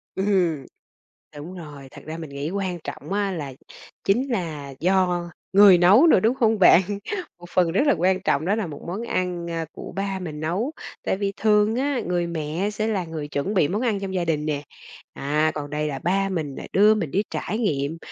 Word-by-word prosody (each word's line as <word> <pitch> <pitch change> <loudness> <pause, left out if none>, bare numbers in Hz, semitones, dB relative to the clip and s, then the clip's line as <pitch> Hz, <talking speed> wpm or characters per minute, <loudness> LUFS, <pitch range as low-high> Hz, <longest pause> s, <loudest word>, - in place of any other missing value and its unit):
Ừm. 180 -8 +1 0.7
Đúng 165 +6 -8
rồi, 145 -6 -10
thật - - -12
ra 160 +1 -5
mình 160 -3 -7
nghĩ 140 +3 -4
quan 190 -2 -2
trọng - - -7
á 200 -1 0
là 145 -6 -5 0.5
chính 245 +8 +2
là 155 - -3
do 180 -1 +1 0.2
người 195 -2 +8
nấu 200 - +6
nữa, 250 - +6
đúng 225 +5 +2
không 225 -4 +2
bạn? 185 -1 +7 0.6
Một 175 - -12
phần 175 -3 +2
rất 240 - +2
là - - +5
quan 185 +2 +2
trọng 145 -5 +1
đó 195 +4 +2
là 220 -3 -2
một 150 -3 -8
món 190 +7 -4
ăn, 180 -6 -2
a, 165 -1 -2
của - - -9
ba 195 -1 -2
mình 155 -5 -6
nấu, 185 - -1 0.3
tại - - 0
vì 200 0 -1
thường 215 0 +3
á, 275 -1 0
người 175 -1 0
mẹ 165 +4 -2
sẽ 215 +1 -2
là 195 -5 -1
người 160 -3 -6
chuẩn 145 +9 -2
bị 155 -6 +3
món 210 +5 -1
ăn 220 -5 0
trong 190 -1 -4
gia 180 -2 0
đình 155 -2 -1
nè, 145 -2 -1 0.5
à, 150 +3 0
còn 145 -1 -5
đây 150 0 -1
là 140 -2 -4
ba 195 +3 0
mình 155 -7 -3
nè - - -7
đưa 210 +2 +6
mình 180 -9 -2
đi 195 +8 +1
trải 215 - -3
nghiệm, 155 -7 -1
180 Hz, 215 wpm, -24 LUFS, 155-200 Hz, 0.7 s, người